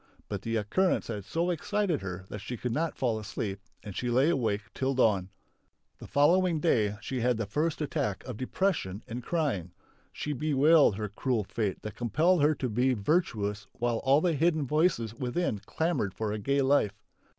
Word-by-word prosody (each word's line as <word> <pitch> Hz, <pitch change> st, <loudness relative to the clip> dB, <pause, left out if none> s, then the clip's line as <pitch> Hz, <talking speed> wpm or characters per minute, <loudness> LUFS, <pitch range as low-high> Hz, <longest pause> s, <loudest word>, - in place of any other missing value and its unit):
But -, -, -3 dB
the 115 Hz, 0 st, -2 dB
occurrence 115 Hz, -, +1 dB
had 100 Hz, -2 st, -4 dB
so 170 Hz, +7 st, 0 dB
excited 180 Hz, -1 st, -1 dB
her 95 Hz, 0 st, -6 dB
that 105 Hz, -, -6 dB
she 120 Hz, +3 st, -5 dB
could 125 Hz, +2 st, -3 dB
not 160 Hz, +6 st, -1 dB
fall 115 Hz, -4 st, 0 dB
asleep 100 Hz, -1 st, -4 dB, 0.2 s
and 100 Hz, -3 st, -8 dB
she 125 Hz, -, -2 dB
lay 130 Hz, +7 st, +4 dB
awake 110 Hz, -8 st, 0 dB
till 135 Hz, 0 st, -1 dB
dawn. 100 Hz, -7 st, +2 dB, 0.7 s
The -, -, -9 dB
following 170 Hz, +3 st, +3 dB
day 110 Hz, -10 st, +2 dB
she 130 Hz, -, -3 dB
had 125 Hz, 0 st, +2 dB
the 115 Hz, -, -2 dB
first 150 Hz, +10 st, -1 dB
attack 105 Hz, -9 st, -2 dB
of 125 Hz, -, -6 dB
depression 130 Hz, -, -1 dB
and 120 Hz, +2 st, -5 dB
crying. 125 Hz, -, -1 dB, 0.4 s
She 150 Hz, -, -3 dB
bewailed 150 Hz, -2 st, +4 dB
her 105 Hz, +1 st, -3 dB
cruel 110 Hz, +2 st, -1 dB
fate 100 Hz, -1 st, -3 dB
that 110 Hz, -, -5 dB
compelled 155 Hz, -, +2 dB
her 150 Hz, +1 st, +4 dB
to 130 Hz, -, -2 dB
be 125 Hz, +3 st, +2 dB
virtuous 105 Hz, -, 0 dB
while 120 Hz, -1 st, -1 dB
all 140 Hz, +3 st, +4 dB
the 175 Hz, -1 st, +2 dB
hidden 160 Hz, 0 st, +2 dB
voices 150 Hz, -, +1 dB
within 125 Hz, -, -1 dB
clamoured 160 Hz, -, -1 dB
for 110 Hz, -2 st, -2 dB
a 105 Hz, -, -3 dB
gay 140 Hz, +6 st, +1 dB
life. 130 Hz, -7 st, +2 dB
125 Hz, 185 wpm, -29 LUFS, 105-155 Hz, 0.7 s, lay